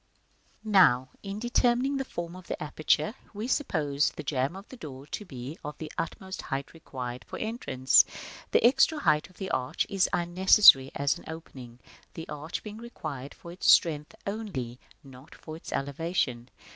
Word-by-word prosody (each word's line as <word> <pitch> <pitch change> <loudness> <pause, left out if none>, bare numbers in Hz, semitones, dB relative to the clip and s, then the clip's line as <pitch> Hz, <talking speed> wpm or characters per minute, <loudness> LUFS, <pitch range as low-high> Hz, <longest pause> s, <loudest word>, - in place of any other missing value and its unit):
§ - - -42 0.6
II. 215 - -4
Now, 130 -10 +5
in 200 0 -6
determining 245 +3 +1
the 270 - -1
form 170 -6 -6
of 185 -2 -12
the - - -4
aperture, 155 +4 0 0.2
we 215 +3 -4
supposed 150 - 0
the - - -6
jamb 135 +2 -1
of 195 +2 -10
the - - -10
door 140 - -9
to 210 - -6
be 135 -1 -8
of 150 0 -6
the 160 - -7
utmost 190 +3 -5
height 135 -1 -4
required 125 -6 -7
for - - -6
entrance. 215 - +3 0.5
The - - +3
extra 270 +5 +5
height 150 - +2
of 185 - -22
the 190 -1 -4
arch 125 0 -1
is 195 -2 +2
unnecessary 175 -5 +6
as 140 -1 0
an - - -16
opening, 130 -7 -9 0.4
the 165 - -7
arch 150 +2 -5
being 215 0 -8
required 150 - -7
for 170 - -11
its 175 - 0
strength 150 -3 +3
only, 185 - -4 0.2
not 135 +1 -14
for 155 - -9
its 165 - -10
elevation. 140 -4 -2
160 Hz, 175 wpm, -28 LUFS, 135-200 Hz, 0.6 s, unnecessary